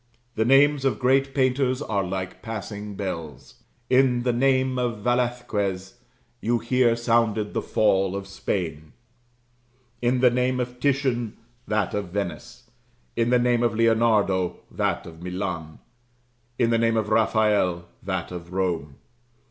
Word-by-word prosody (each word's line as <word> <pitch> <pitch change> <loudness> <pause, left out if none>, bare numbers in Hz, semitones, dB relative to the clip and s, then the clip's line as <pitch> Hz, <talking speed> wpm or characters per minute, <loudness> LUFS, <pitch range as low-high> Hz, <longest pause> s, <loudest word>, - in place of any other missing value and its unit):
The 110 - 0
names 140 +2 +5
of 135 - +1
great 135 +2 +2
painters 130 -1 +2
are 105 -9 -1
like 95 0 -5
passing 105 -2 -6
bells: 85 -7 -6 0.3
in 125 -2 +3
the 125 -1 +1
name 130 0 +2
of 120 -4 -2
Velasquez, 115 -6 -1 0.4
you 120 +2 +1
hear 120 0 +2
sounded 115 -3 +1
the - - -1
fall 95 -3 +1
of 100 0 -4
Spain; 80 -5 -4 1.1
in 125 +1 +2
the 125 -1 +5
name 125 +1 +1
of 125 0 -4
Titian, 130 -5 0 0.3
that 105 -3 0
of 105 -2 -2
Venice; 105 +6 -5 0.5
in 115 0 +1
the 125 - +5
name 120 -1 +2
of 120 -2 +1
Leonardo, 110 -5 +2
that - - -1
of 80 0 -11
Milan; 90 -4 -4 0.8
in 120 -2 +2
the 115 - +3
name 115 0 +2
of 110 -1 -1
Raphael, 105 -5 +2 0.2
that 95 -3 -3
of 90 -1 -8
Rome. 85 -7 -1
115 Hz, 140 wpm, -24 LUFS, 95-125 Hz, 1.1 s, names